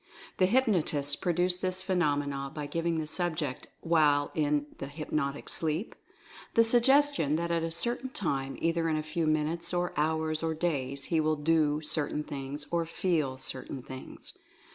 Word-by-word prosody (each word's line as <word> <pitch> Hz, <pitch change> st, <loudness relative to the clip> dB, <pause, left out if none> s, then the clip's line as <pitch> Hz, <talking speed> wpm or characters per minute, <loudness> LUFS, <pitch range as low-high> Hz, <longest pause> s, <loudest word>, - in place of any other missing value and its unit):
The 185 Hz, -, +5 dB
hypnotists 175 Hz, -, +2 dB
pro 175 Hz, -, -1 dB
duce 180 Hz, +1 st, +2 dB
this 185 Hz, 0 st, -1 dB
phenomena 145 Hz, -6 st, 0 dB
by 150 Hz, -1 st, -3 dB
giving 165 Hz, +2 st, -1 dB
the 155 Hz, -, -2 dB
subject 155 Hz, -4 st, -1 dB
while 150 Hz, -4 st, +3 dB
in 150 Hz, -1 st, +1 dB
the 135 Hz, -, -4 dB
hypnotic 145 Hz, -1 st, -3 dB
sleep 160 Hz, +6 st, -1 dB, 0.3 s
(?) -, -, -18 dB
the 230 Hz, -, +7 dB
suggestion 245 Hz, -, +4 dB
that 170 Hz, +1 st, -1 dB
at 170 Hz, -1 st, +1 dB
a 165 Hz, -, -1 dB
certain 240 Hz, +10 st, -2 dB
time, 135 Hz, -, -2 dB
either 165 Hz, 0 st, +1 dB
in 155 Hz, -, +1 dB
a 155 Hz, -, -2 dB
few 155 Hz, +1 st, -1 dB
minutes, 160 Hz, +3 st, 0 dB
or 175 Hz, 0 st, 0 dB
hours, 155 Hz, +1 st, 0 dB
or 160 Hz, -1 st, -1 dB
days, 140 Hz, -5 st, -1 dB
he 160 Hz, -, +4 dB
will 155 Hz, 0 st, +2 dB
do 150 Hz, 0 st, +2 dB
certain 150 Hz, -1 st, -1 dB
things, 140 Hz, 0 st, -5 dB
or 170 Hz, -1 st, +1 dB
feel 160 Hz, -6 st, 0 dB
certain 130 Hz, 0 st, -4 dB
things. 130 Hz, 0 st, -7 dB
160 Hz, 165 wpm, -30 LUFS, 145-175 Hz, 0.3 s, the